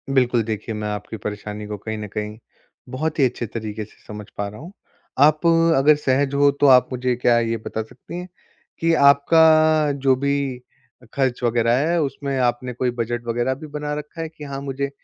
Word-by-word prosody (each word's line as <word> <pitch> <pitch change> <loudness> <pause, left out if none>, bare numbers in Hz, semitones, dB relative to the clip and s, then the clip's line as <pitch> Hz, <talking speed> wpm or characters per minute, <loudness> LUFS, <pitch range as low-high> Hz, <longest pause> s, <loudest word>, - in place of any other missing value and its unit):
बिल्कुल, 120 -3 +3
देखिए 110 0 -4
मैं 105 0 -4
आपकी 105 +1 -5
परेशानी 105 +1 -6
को 105 0 -5
कहीं 110 +2 -5
न 105 0 -6
कहीं 105 +1 -5 0.5
बहुत 150 +5 -3
ही 135 - +5
अच्छे 125 -1 -2
तरीके 110 -1 -5
से 110 - -22
समझ 105 -1 -8
पा 100 - -2
रहा 105 +3 -10
हूँ। 170 +6 -10 0.5
आप 150 +3 +4 0.3
अगर 150 +3 +5
सहज 140 -1 0
हो 140 0 +4
तो 145 - +6
आप 130 -2 +6
मुझे 125 -1 -1
क्या 120 -1 +3
ये 115 0 -1
बता 110 - -3
सकती 110 +9 -11
हैं 180 - -7 0.5
कि 165 0 +2 0.2
आपका 155 +1 +4
जो 135 -2 +2
भी 140 +2 0 0.7
अ, - - -17
ख़र्च 130 -3 -1
वग़ैरह 120 0 +2
है 170 0 +2
उसमें 140 -1 -3
आपने 125 0 0
कोई 125 +1 -1
बजट 120 +1 -3
वग़ैरह 120 +3 0
भी 155 +3 -10
बना 150 0 -4
रखा 155 +2 -9
है 160 - -4
कि 155 -1 -13
हाँ, 140 -1 -6
मुझे 140 0 -3
130 Hz, 200 wpm, -22 LUFS, 115-145 Hz, 0.7 s, तो